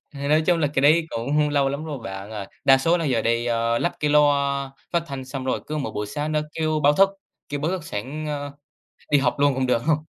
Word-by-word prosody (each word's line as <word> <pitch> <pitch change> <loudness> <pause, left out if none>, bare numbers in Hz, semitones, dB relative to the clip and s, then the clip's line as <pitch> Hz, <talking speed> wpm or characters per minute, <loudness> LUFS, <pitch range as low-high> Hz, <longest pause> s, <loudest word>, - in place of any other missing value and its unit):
Nói 145 +3 +1
chung 175 -2 +3
là 150 - +3
cái 135 - +2
đấy 155 +4 +5
cũng 145 +6 0
lâu 140 -2 +2
lắm 140 +3 -4
rồi 150 -4 -5
bạn 95 +2 -7
ơi. 105 -3 -6 0.2
Đa 135 -1 +6
số 165 +6 +2
là 165 - -2
giờ 125 -6 +1
đi 115 +1 0 0.3
lắp 175 - 0
cái 150 -1 +1
loa 140 -2 +2 0.2
phát 170 - +2
thanh 135 -2 -6
xong 130 0 -6
rồi 130 - -1
cứ 155 - -4
mỗi 140 - -3
buổi 105 0 -3
sáng 150 +6 -3
nó 150 - +2
kêu 155 -1 -1
báo 145 +1 +6
thức, 195 +5 +5 0.4
kêu 145 0 -3
báo 155 +4 0
thức 185 -4 -3
sẵn, 150 +4 -5
ơ, 145 -1 -4 0.6
đi 145 - +6
học 130 -3 +1
luôn 145 -1 +4
cũng 130 0 0
được 120 -2 +2
hông. 155 -2 +3
145 Hz, 250 wpm, -23 LUFS, 130-155 Hz, 0.6 s, Đa